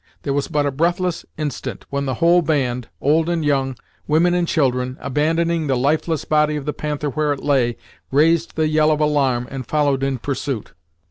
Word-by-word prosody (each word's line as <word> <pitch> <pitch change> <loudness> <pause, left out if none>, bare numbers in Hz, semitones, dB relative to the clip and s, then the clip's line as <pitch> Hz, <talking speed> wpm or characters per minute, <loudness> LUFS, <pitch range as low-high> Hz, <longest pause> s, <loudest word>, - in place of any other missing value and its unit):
There 140 - -1
was 140 0 0
but 145 -1 0
a 145 - 0
breathless 175 +4 -1
instant, 150 -2 -4
when 140 0 -2
the 130 - -1
whole 170 +6 +4
band, 125 -6 -1
old 160 +4 +2
and 165 -3 0
young, 135 -2 +1 0.3
women 165 +3 +3
and 175 -1 +1
children, 130 -4 0
abandoning 160 +3 0
the 135 -2 +1
lifeless 155 +4 0
body 150 0 +2
of 145 -2 -4
the 150 - -2
Panther 150 -1 -3
where 150 +1 0
it 140 - -8
lay, 125 -5 +1 0.3
raised 160 +4 +2
the 155 -1 +1
yell 155 0 +3
of 155 -1 +2
alarm 135 -5 +1
and 130 -3 -6
followed 145 -3 +1
in 135 -1 0
pursuit. 130 -2 -4
150 Hz, 190 wpm, -20 LUFS, 135-155 Hz, 0.3 s, whole